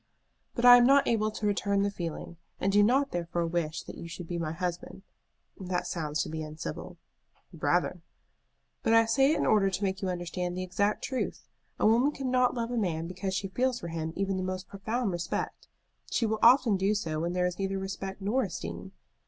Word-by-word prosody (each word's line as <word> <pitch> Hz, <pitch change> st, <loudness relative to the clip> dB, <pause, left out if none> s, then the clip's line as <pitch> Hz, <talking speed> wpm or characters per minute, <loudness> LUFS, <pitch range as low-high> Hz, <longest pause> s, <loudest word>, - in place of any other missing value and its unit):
"But 240 Hz, -, 0 dB
I 245 Hz, 0 st, +11 dB
am 245 Hz, 0 st, +5 dB
not 275 Hz, +1 st, +5 dB
able 215 Hz, -2 st, +2 dB
to 215 Hz, 0 st, -5 dB
return 200 Hz, -1 st, +1 dB
the 200 Hz, -, 0 dB
feeling, 170 Hz, -2 st, -6 dB, 0.2 s
and 195 Hz, -, +1 dB
do 205 Hz, +1 st, +5 dB
not 265 Hz, +6 st, +3 dB
therefore 170 Hz, 0 st, -2 dB
wish 165 Hz, -2 st, -2 dB
that -, -, -9 dB
you 170 Hz, -, -7 dB
should 175 Hz, 0 st, -8 dB
be 175 Hz, 0 st, -3 dB
my 155 Hz, -2 st, -2 dB
husband. 180 Hz, +2 st, -5 dB, 0.6 s
That 180 Hz, -2 st, -2 dB
sounds 155 Hz, -2 st, -2 dB
to -, -, -7 dB
be 160 Hz, 0 st, -4 dB
uncivil." 155 Hz, +1 st, -6 dB, 0.6 s
"Rather." -, -, 0 dB, 0.8 s
"But 225 Hz, -, +2 dB
I 225 Hz, 0 st, +6 dB
say 270 Hz, +5 st, +3 dB
it -, -, +1 dB
in -, -, 0 dB
order 205 Hz, -2 st, +4 dB
to 190 Hz, +2 st, -3 dB
make 190 Hz, -1 st, -1 dB
you 190 Hz, -, -1 dB
understand 180 Hz, 0 st, -3 dB
the 185 Hz, -, -2 dB
exact 200 Hz, +3 st, 0 dB
truth. 260 Hz, -2 st, -3 dB, 0.3 s
A -, -, +2 dB
woman 235 Hz, +6 st, +4 dB
cannot 255 Hz, -3 st, +1 dB
love 235 Hz, 0 st, -2 dB
a 245 Hz, -, -2 dB
man 165 Hz, -7 st, -1 dB
because 185 Hz, +2 st, -4 dB
she 195 Hz, +1 st, -2 dB
feels 250 Hz, +4 st, 0 dB
for 170 Hz, -, -6 dB
him 160 Hz, -1 st, -3 dB
even 195 Hz, 0 st, -1 dB
the -, -, -2 dB
most 185 Hz, 0 st, -4 dB
profound 215 Hz, +3 st, -2 dB
respect. 175 Hz, -1 st, -4 dB, 0.4 s
She 235 Hz, -, +1 dB
will 220 Hz, 0 st, -1 dB
often 235 Hz, -4 st, +6 dB
do 195 Hz, +3 st, +1 dB
so 160 Hz, -6 st, -2 dB
when 170 Hz, +2 st, -2 dB
there 180 Hz, 0 st, +1 dB
is 180 Hz, 0 st, -3 dB
neither 195 Hz, 0 st, -1 dB
respect 195 Hz, 0 st, -5 dB
nor 225 Hz, +7 st, +1 dB
esteem. 90 Hz, -, -5 dB
195 Hz, 210 wpm, -29 LUFS, 175-225 Hz, 0.8 s, I